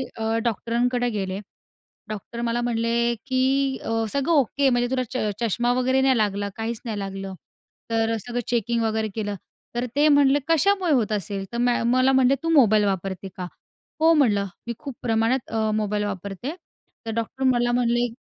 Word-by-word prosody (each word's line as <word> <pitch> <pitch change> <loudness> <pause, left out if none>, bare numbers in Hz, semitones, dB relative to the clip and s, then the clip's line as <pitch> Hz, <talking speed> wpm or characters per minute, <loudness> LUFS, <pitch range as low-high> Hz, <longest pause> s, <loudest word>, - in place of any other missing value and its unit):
अ, 225 0 -1
डॉक्टरांकडे 240 +2 0
गेले. 195 -3 -3 0.7
डॉक्टर 215 +3 -6
मला 235 0 0
म्हणले 235 0 +1
की 265 +1 +1
अ, - - -5 0.2
सगळं 280 +4 0
ओके 280 -1 +3
म्हणजे 245 -1 +1
तुला 255 -1 +1
च 255 - -2 0.2
चष्मा 240 +2 +1
वगैरे 260 +1 +2
नाही 265 -2 +3
लागला, 205 -1 0
काहीच 225 0 -4
नाही 215 -3 -3
लागलं. 195 0 -5 0.6
तर 225 0 +1
अ, - - 0
सगळं 245 0 -2
चेकिंग 235 -1 0
वगैरे 220 0 0
केलं. 205 -2 -2 0.4
तर 240 +1 0
ते 295 +1 +4
म्हणले, 285 -1 +5
कशामुळे 365 +2 +2
होत 230 -6 +1
असेल? 200 -1 -2
तर 235 - -4
म 245 +1 +2 0.2
मला 255 +1 +4
म्हणले, 265 0 +4
तू 330 - 0
मोबाईल 220 -9 +5
वापरते 195 -1 -2
का? 180 -1 -4 0.5
हो 325 +1 +6
म्हणलं, 210 -10 +3 0.2
मी 235 - -2
खूप 275 -5 -7
प्रमाणात 230 +2 0
अ, 220 -1 0
मोबाईल 210 -1 0
वापरते. 200 - -5 0.5
तर 225 - -3
डॉक्टर 230 +3 -3
मला 240 -1 +2
म्हणले, 240 0 +2
235 Hz, 170 wpm, -24 LUFS, 215-260 Hz, 0.7 s, हो